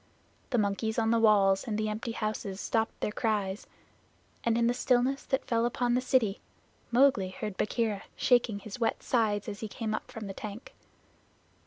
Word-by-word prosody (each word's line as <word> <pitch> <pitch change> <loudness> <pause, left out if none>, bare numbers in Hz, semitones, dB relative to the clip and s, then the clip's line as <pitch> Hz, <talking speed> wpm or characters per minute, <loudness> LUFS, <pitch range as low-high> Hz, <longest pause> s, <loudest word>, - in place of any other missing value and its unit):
The 245 - +1
monkeys 215 +1 0
on 225 -1 +2
the 230 - +3
walls 200 -3 +4
and 210 -2 -1
the 215 0 0
empty 220 +2 -3
houses 215 -3 -3
stopped 225 +1 -1
their - - 0
cries, 210 -3 -1 0.8
and 230 -1 +2
in 235 - +3
the 240 - +3
stillness 255 +2 +2
that 265 - -1
fell 230 -1 +1
upon 240 0 +1
the 250 - +2
city 245 -6 +1 0.5
Mowgli 240 -6 +4
heard 205 +1 -5
Bagheera 210 0 -1
shaking 240 -4 +3
his 205 +3 -8
wet 230 - 0
sides 215 -4 +1
as 200 - -5
he 220 - -4
came 215 +1 -4
up - - -4
from 225 -2 -7
the 195 - -5
tank. 210 +4 -8
220 Hz, 180 wpm, -30 LUFS, 205-240 Hz, 0.8 s, walls